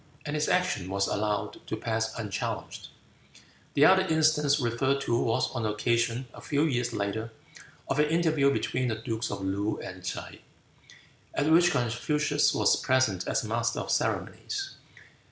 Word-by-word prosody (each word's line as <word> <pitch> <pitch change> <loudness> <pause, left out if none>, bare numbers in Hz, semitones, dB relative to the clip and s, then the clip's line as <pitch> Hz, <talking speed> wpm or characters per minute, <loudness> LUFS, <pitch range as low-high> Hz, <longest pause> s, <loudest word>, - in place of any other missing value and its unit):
And 145 0 -3
his 150 0 0
action 180 - +1
was 100 +1 +1
allowed 105 0 -2
to - - -3
pass 110 0 -2
unchallenged. 110 -1 -4 0.9
The - - +6
other - - +6
instance 155 -2 +3
referred 130 +3 +1
to 120 - 0
was 115 - +1
on 120 - -2
the 110 -1 -1
occasion, 120 +3 0
a - - -11
few 145 0 0
years 125 -6 0
later, 110 +3 -3 0.6
of 135 - -1
an 150 - +4
interview 160 -4 +3
between 130 -2 -1
the 115 - -1
dukes 115 +1 -3
of - - -4
Loo 100 +2 -1
and 90 0 -8
T'se, 90 - -6 1.0
at 145 +2 +1
which 175 +2 +6
Confucius 145 +4 +1
was - - +3
present 130 -9 +1
as - - 0
master 115 +1 -1
of - - -4
ceremonies. 395 -2 -2
120 Hz, 155 wpm, -28 LUFS, 110-150 Hz, 1.0 s, The